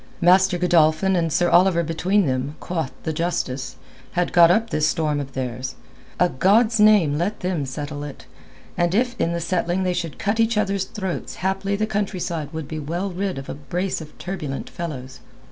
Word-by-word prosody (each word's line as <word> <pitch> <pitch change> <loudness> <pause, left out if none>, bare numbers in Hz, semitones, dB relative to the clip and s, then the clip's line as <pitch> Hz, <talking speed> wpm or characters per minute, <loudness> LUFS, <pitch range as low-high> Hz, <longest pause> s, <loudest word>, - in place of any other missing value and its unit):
Master 185 +1 +5
Godolphin 175 +1 +3
and 165 -2 +1
Sir 175 +2 +2
Oliver 175 0 +5
between 175 +5 +1
them, 130 +2 -2
quoth 160 -6 -3
the 160 - -2
justice, 150 -5 -2 0.4
had 180 0 0
got 170 -1 +7
up 225 +5 +2
this 155 0 +2
storm 155 -2 0
of 135 -1 -6
theirs. 130 0 -4 0.4
A 180 - +5
God's 215 - +3
name 200 -9 +5
let 195 +5 -2
them 180 -6 -1
settle 145 +2 -5
it, 145 -2 -9 0.5
and 175 +1 +1
if 245 +2 +1
in 165 - +1
the 170 - -1
settling 175 +1 0
they 180 -1 +1
should 175 -3 -4
cut 210 +2 -1
each 225 -1 +2
other's 200 -2 0
throats 190 -3 -5
haply 195 +1 0
the 215 +2 0
countryside 185 -7 -3
would 160 -3 -5
be 155 +1 -5
well 170 +6 -3
rid 190 -2 -2
of 135 - -7
a - - -4
brace 175 +6 -3
of 155 -1 -12
turbulent 155 -8 -5
fellows. 135 -6 -6
175 Hz, 185 wpm, -22 LUFS, 155-190 Hz, 0.5 s, got